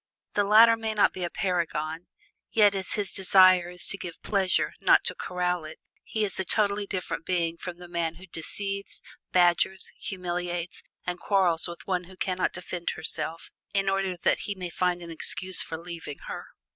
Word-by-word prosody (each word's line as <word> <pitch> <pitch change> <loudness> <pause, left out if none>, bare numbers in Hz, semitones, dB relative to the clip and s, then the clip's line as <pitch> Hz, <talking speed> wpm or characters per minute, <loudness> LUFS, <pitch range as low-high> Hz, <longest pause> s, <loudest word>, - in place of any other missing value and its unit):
The 205 - +3
latter 225 +3 +8
may 220 -1 -3
not 210 - +4
be 185 - -4
a 175 - -1
paragon, 170 -4 -1 0.5
yet 205 -2 +5
as 190 -1 -3
his 205 -2 -1
desire 185 -2 +6
is 180 0 -5
to 200 - -2
give 175 -3 -7
pleasure, 195 -3 +1
not - - +6
to - - -1
corral 180 -1 -1
it, 155 +1 -9 0.3
he 220 - -2
is 195 - -5
a - - +1
totally 200 +1 +1
different 180 -4 -3
being 170 -2 0
from 175 0 -7
the 175 0 -10
man 170 -1 -2
who 185 +3 -12
deceives, 195 +4 -3 0.3
badgers, 180 +1 +3
humiliates, 175 -2 -3 0.2
and 180 0 -3
quarrels 185 -5 +2
with 170 0 -9
one 180 -2 -1
who 185 +1 -15
can 185 -1 -1
not - - +2
defend 180 -1 -4
herself, 165 +1 -3 0.2
in 195 0 +2
order 195 -2 0
that - - +2
he 205 - -4
may 180 -2 -5
find 180 0 0
an 170 - -8
excuse 185 +2 0
for 160 - -2
leaving 165 -3 -7
her. - - -6
180 Hz, 185 wpm, -27 LUFS, 170-195 Hz, 0.5 s, latter